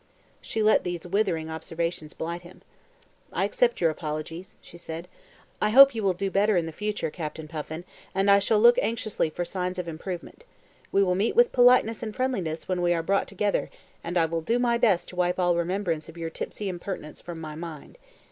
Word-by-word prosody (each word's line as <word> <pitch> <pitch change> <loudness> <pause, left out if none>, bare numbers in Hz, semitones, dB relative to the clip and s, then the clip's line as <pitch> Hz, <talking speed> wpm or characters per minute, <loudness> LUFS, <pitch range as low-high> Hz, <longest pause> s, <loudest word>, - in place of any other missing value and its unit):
She 220 - -2
let 215 - +4
these 175 -2 -4
withering 180 -4 0
observations 160 0 -4
blight 170 +2 -4
him. 175 +1 -15 0.7
"I - - 0
accept 235 +4 +1
your 165 -2 +3
apologies," 155 +3 -6
she - - -15
said. 170 0 -7 0.5
"I 210 - +3
hope 275 +4 +9
you 225 - -3
will 195 -3 +1
do 195 +2 -2
better 205 0 +3
in 170 - +1
the 165 - -5
future, 210 -1 -3
Captain 155 -1 -6
Puffin, 160 +1 -6 0.3
and 195 +1 +4
I 200 - +7
shall 210 +2 +2
look 240 +2 +7
anxiously 220 -7 -1
for 175 +3 -4
signs 180 0 -3
of 180 -1 -3
improvement. 175 - -7 0.5
We 200 - +4
will 180 -2 +2
meet 200 - 0
with 480 +1 +5
politeness 245 -3 +5
and 215 -2 -5
friendliness 195 -12 -2
when 185 -1 -1
we 175 0 +3
are 165 - -1
brought 195 +4 +1
together 200 +1 -1 0.3
and 175 +1 -2
I 165 - +4
will 165 0 -2
do 230 +9 +1
my 240 -1 +2
best 225 -7 +2
to - - -11
wipe 180 0 +1
all 175 -1 +3
remembrance 170 -2 -1
of 165 - -12
your 165 -1 -4
tipsy 205 - -5
impertinence 175 -4 -6
from 175 -2 -7
my 155 -1 -6
mind. 165 - -9
180 Hz, 205 wpm, -26 LUFS, 165-210 Hz, 0.7 s, hope